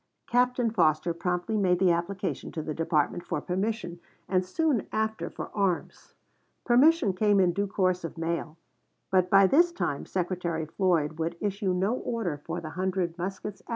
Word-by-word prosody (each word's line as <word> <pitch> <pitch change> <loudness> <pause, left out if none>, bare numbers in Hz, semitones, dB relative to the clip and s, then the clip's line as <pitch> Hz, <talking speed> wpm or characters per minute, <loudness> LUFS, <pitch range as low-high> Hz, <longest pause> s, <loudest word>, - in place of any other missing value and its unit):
Captain 245 -1 +2
Foster 160 -4 +2
promptly 180 +5 -2
made 185 -4 +3
the 185 -1 +4
application 185 +3 -2
to 160 - -4
the 155 - -4
department 160 +1 0
for 170 -4 -2
permission, 185 0 -3 0.3
and 185 -1 +2
soon 280 - 0
after 220 0 -1
for - - -7
arms. 195 -4 -2 0.5
Permission 255 - +4
came 205 +1 +3
in 180 -2 +3
due 200 +2 -1
course 185 -2 0
of 165 - -6
mail; 165 -1 -3 0.5
but 185 -1 +3
by 195 +1 +7
this 340 - +4
time 145 - -3
Secretary 175 -3 -2
Floyd 165 -2 0
would 165 +1 -2
issue 200 -1 -1
no 190 +5 +1
order 220 - -3
for 170 +1 -4
the 155 -2 -7
hundred 185 -2 -1
muskets 195 +3 -5
asked - - -35
for. - - -21
185 Hz, 170 wpm, -28 LUFS, 170-210 Hz, 0.5 s, by